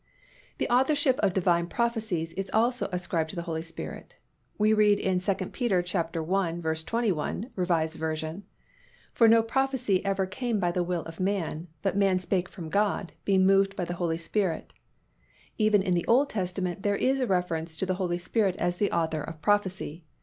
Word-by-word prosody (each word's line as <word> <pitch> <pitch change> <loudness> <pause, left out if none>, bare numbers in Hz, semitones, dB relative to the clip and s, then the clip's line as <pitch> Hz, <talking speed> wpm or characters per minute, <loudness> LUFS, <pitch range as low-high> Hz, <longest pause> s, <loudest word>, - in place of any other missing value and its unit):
The - - -1
authorship 265 +2 +3
of 200 - +3
Divine 170 -2 +2
prophecies 220 -8 -1
is 195 0 -4
also 240 +3 +1
ascribed 175 -3 -1
to - - -8
the 170 - -3
Holy 165 -2 -3
Spirit. 165 0 -7 0.4
We 215 +1 +4
read 210 -1 +4
in 185 -1 +1
2 195 +2 +1
Pet. 190 -1 -4 0.3
i. 180 -1 +1
21, 170 - -1
R. 180 - 0
V., 160 0 -1 0.7
"For 230 - +5
no 225 0 +6
prophecy 250 -5 0
ever 195 -1 0
came 230 +3 -2
by 175 -2 +1
the 180 - 0
will 175 -1 -1
of 165 0 -10
man: 185 -4 -1 0.2
but 195 -1 0
men 195 -2 +3
spake 180 0 -1
from 170 -4 -8
God, 200 0 0
being 190 -1 +4
moved 195 +1 +4
by 180 - -2
the 175 - -4
Holy 170 -2 -1
Ghost." 170 +1 -2 0.9
Even 215 -2 +4
in 185 -2 +1
the 175 -1 0
Old 270 +5 +4
Testament, 185 -2 -2
there 205 0 +1
is 265 +1 +1
a 255 - 0
reference 165 -3 -1
to - - 0
the 185 - 0
Holy 175 -1 0
Spirit 190 +1 0
as 175 0 -1
the 205 - +1
author 160 -2 0
of 165 +1 -7
prophecy. 190 -5 0
185 Hz, 180 wpm, -28 LUFS, 170-205 Hz, 0.9 s, no